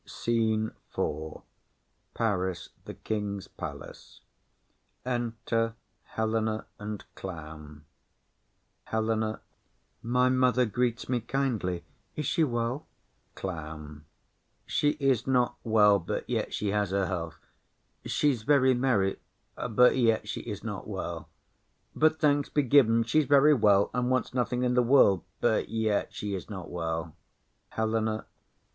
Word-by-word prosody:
_] -, -, -15 dB
SCENE 110 Hz, -2 st, 0 dB, 0.3 s
IV. 75 Hz, +1 st, -3 dB, 0.7 s
Paris. 95 Hz, -6 st, -1 dB, 0.2 s
The -, -, -8 dB
King's 105 Hz, -2 st, -3 dB
palace. -, -, -9 dB, 0.8 s
Enter 115 Hz, -2 st, -1 dB, 0.4 s
Helena 110 Hz, 0 st, 0 dB
and 105 Hz, 0 st, -6 dB
Clown. 75 Hz, -4 st, -9 dB, 1.0 s
HELENA. 110 Hz, 0 st, -1 dB, 0.6 s
My 125 Hz, +2 st, +2 dB
mother 125 Hz, -1 st, +3 dB
greets 120 Hz, +2 st, -1 dB
me 125 Hz, -1 st, +1 dB
kindly: 115 Hz, -9 st, -2 dB, 0.3 s
is 150 Hz, -, -3 dB
she 165 Hz, -, +2 dB
well? 120 Hz, +1 st, -2 dB, 0.5 s
CLOWN. 75 Hz, -4 st, -7 dB, 0.6 s
She 145 Hz, +1 st, +1 dB
is 135 Hz, -4 st, +1 dB
not 125 Hz, -2 st, +2 dB
well, 105 Hz, -3 st, +5 dB
but 85 Hz, -, -4 dB
yet -, -, -1 dB
she 105 Hz, -, -2 dB
has 105 Hz, -1 st, 0 dB
her 100 Hz, 0 st, +1 dB
health; 85 Hz, -3 st, -4 dB, 0.7 s
she's 140 Hz, -6 st, +1 dB
very 130 Hz, +1 st, +4 dB
merry, 120 Hz, -7 st, +1 dB, 0.4 s
but 125 Hz, +2 st, +3 dB
yet 115 Hz, -3 st, +2 dB
she -, -, -4 dB
is -, -, -6 dB
not -, -, -5 dB
well. -, -, -5 dB, 0.7 s
But 155 Hz, 0 st, +3 dB
thanks 145 Hz, -2 st, +2 dB
be 145 Hz, -, +1 dB
given, 115 Hz, -4 st, +5 dB
she's 145 Hz, +7 st, +2 dB
very 145 Hz, +2 st, +6 dB
well, 105 Hz, -6 st, +4 dB
and 125 Hz, 0 st, 0 dB
wants 130 Hz, -1 st, 0 dB
nothing 125 Hz, 0 st, 0 dB
i' -, -, +2 dB
the 125 Hz, 0 st, +3 dB
world; 115 Hz, -, +5 dB, 0.2 s
but -, -, +1 dB
yet 110 Hz, -2 st, 0 dB
she 105 Hz, -5 st, -4 dB
is 95 Hz, -, -5 dB
not 95 Hz, -4 st, -7 dB
well. 80 Hz, -2 st, -3 dB, 0.6 s
HELENA. 110 Hz, 0 st, -1 dB
110 Hz, 125 wpm, -28 LUFS, 100-125 Hz, 1.0 s, very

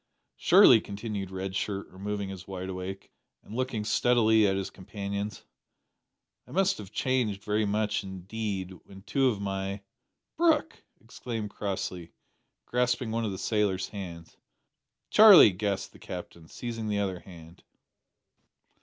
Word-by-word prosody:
"Surely," -, -, +7 dB
continued 100 Hz, -2 st, -5 dB
Red 95 Hz, 0 st, -5 dB
Shirt, 100 Hz, 0 st, -3 dB
removing 100 Hz, +1 st, -4 dB
his 95 Hz, -1 st, -9 dB
wide 95 Hz, -1 st, -5 dB
awake, 95 Hz, +1 st, -6 dB, 0.3 s
and -, -, -12 dB
looking 125 Hz, -3 st, -2 dB
steadily 110 Hz, -1 st, +4 dB
at 95 Hz, -, +1 dB
his 95 Hz, 0 st, -3 dB
companions, 100 Hz, +2 st, -5 dB, 1.0 s
"I -, -, -14 dB
must 190 Hz, -, +2 dB
have 100 Hz, -3 st, -9 dB
changed 120 Hz, -7 st, -1 dB
very 105 Hz, 0 st, 0 dB
much 105 Hz, +1 st, 0 dB
indeed 95 Hz, 0 st, -5 dB
when 95 Hz, -1 st, -14 dB
two 130 Hz, +6 st, +1 dB
of 110 Hz, -5 st, 0 dB
my 100 Hz, 0 st, -3 dB, 0.3 s
" -, -, -57 dB
"Brooke!" 320 Hz, -2 st, +2 dB, 0.2 s
exclaimed 115 Hz, -2 st, -6 dB
Crossley, 95 Hz, -4 st, -4 dB, 0.5 s
grasping 125 Hz, -1 st, 0 dB
one 115 Hz, 0 st, -1 dB
of 105 Hz, -, -2 dB
the 95 Hz, -, -5 dB
sailor's 100 Hz, -2 st, 0 dB
hands. 85 Hz, -5 st, -8 dB, 0.7 s
"Charlie!" 210 Hz, -, +9 dB
gasped 100 Hz, +1 st, -3 dB
the -, -, -16 dB
Captain, 85 Hz, -2 st, -8 dB
seizing 115 Hz, +1 st, -5 dB
the 105 Hz, -1 st, 0 dB
other 95 Hz, -3 st, -1 dB
hand. 85 Hz, -1 st, -14 dB
100 Hz, 135 wpm, -28 LUFS, 95-110 Hz, 1.0 s, Charlie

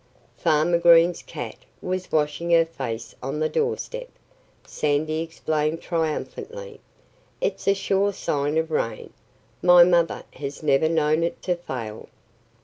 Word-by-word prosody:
"Farmer 165 Hz, +1 st, +2 dB
Green's 170 Hz, 0 st, +5 dB
cat -, -, -7 dB, 0.2 s
was 185 Hz, 0 st, -4 dB
washing 155 Hz, +2 st, 0 dB
her 165 Hz, -1 st, +5 dB
face 120 Hz, -8 st, -6 dB
on 135 Hz, +4 st, -3 dB
the 155 Hz, -, +2 dB
doorsteps," 470 Hz, -, -2 dB, 0.6 s
Sandy 155 Hz, +1 st, -1 dB
explained 160 Hz, -1 st, -2 dB
triumphantly. 440 Hz, -, -4 dB, 0.6 s
"It's -, -, -2 dB
a 195 Hz, -, +5 dB
sure 195 Hz, +1 st, +1 dB
sign 145 Hz, -5 st, -1 dB
of 160 Hz, 0 st, 0 dB
rain. 115 Hz, -6 st, -2 dB, 0.5 s
My 180 Hz, -1 st, +8 dB
mother 170 Hz, -1 st, +2 dB
has 140 Hz, +2 st, -7 dB
never 145 Hz, +1 st, +3 dB
known 155 Hz, -1 st, +2 dB
it 170 Hz, -, -2 dB
to 180 Hz, -1 st, +1 dB
fail." 120 Hz, -10 st, -7 dB
165 Hz, 130 wpm, -24 LUFS, 150-180 Hz, 0.6 s, My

